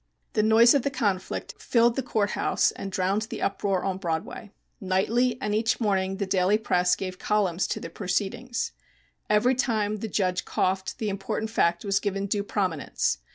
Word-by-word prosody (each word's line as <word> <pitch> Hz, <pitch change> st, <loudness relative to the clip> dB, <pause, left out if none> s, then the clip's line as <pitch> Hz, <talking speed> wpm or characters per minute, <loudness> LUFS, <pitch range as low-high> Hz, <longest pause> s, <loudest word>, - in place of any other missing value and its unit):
The 215 Hz, -, +2 dB
noise 220 Hz, +2 st, +6 dB
of 280 Hz, -, +3 dB
the 280 Hz, -, 0 dB
conflict 205 Hz, -9 st, -2 dB
filled 235 Hz, 0 st, +3 dB
the 270 Hz, -, 0 dB
court 215 Hz, -5 st, 0 dB
house -, -, +1 dB
and 195 Hz, -, -7 dB
drowned 195 Hz, +3 st, 0 dB
the -, -, -5 dB
uproar 195 Hz, -2 st, 0 dB
on 190 Hz, -1 st, -2 dB
Broadway. 170 Hz, +4 st, -4 dB, 0.3 s
Nightly 230 Hz, +5 st, +1 dB
and 210 Hz, -5 st, -2 dB
each 220 Hz, +1 st, +1 dB
morning 195 Hz, -3 st, 0 dB
the 200 Hz, -, -1 dB
daily 190 Hz, +2 st, +2 dB
press 180 Hz, -4 st, +2 dB
gave 185 Hz, -1 st, -6 dB
columns 195 Hz, -4 st, +1 dB
to -, -, -3 dB
the 165 Hz, -, -8 dB
proceedings. 210 Hz, +6 st, -2 dB, 0.6 s
Every 210 Hz, +5 st, +4 dB
time 220 Hz, -5 st, 0 dB
the 220 Hz, -, -4 dB
judge 185 Hz, -3 st, 0 dB
coughed 190 Hz, +1 st, -1 dB
the 215 Hz, -, -2 dB
important 200 Hz, +3 st, -3 dB
fact 170 Hz, -3 st, +1 dB
was 195 Hz, 0 st, +2 dB
given 200 Hz, -1 st, -2 dB
due 200 Hz, +1 st, 0 dB
prominence. 180 Hz, -, -1 dB
200 Hz, 175 wpm, -26 LUFS, 190-220 Hz, 0.6 s, noise